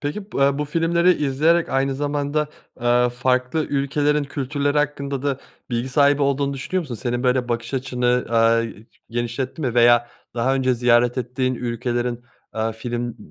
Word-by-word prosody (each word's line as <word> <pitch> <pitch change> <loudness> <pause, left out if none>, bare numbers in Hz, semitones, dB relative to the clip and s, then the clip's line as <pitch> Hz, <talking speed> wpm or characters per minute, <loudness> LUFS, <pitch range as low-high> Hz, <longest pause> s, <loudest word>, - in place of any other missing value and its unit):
Peki, 195 +8 -5
bu - - -2
a 140 +1 +3
bu 150 - 0
filmleri 170 +3 +2
izleyerek 160 +5 +2
aynı 135 0 0
zamanda, 145 +1 -1 0.3
eee, 120 0 +3
farklı 125 +4 0
ülkelerin 145 +1 +1
kültürleri 145 +1 -1
hakkında 140 -2 -2
da 140 -2 -1 0.3
bilgi 120 +2 -1
sahibi 140 +1 +3
olduğunu 140 0 +1
düşünüyor 185 +7 -2
musun? 135 -7 -6
Senin 120 +2 -3
böyle 125 -1 +1
bakış 115 +2 -3
açını, 125 -1 0
aaa, 115 0 +3 0.5
genişletti 120 +5 -3
mi 125 -5 -1
veya 120 0 +5 0.3
daha 125 +3 +1
önce 130 -1 +1
ziyaret 120 +1 +3
ettiğin 130 +1 -1
ülkelerin, 120 0 -2 0.3
aaa, 110 0 -1
film, 120 +1 -4
130 Hz, 155 wpm, -22 LUFS, 120-145 Hz, 0.5 s, veya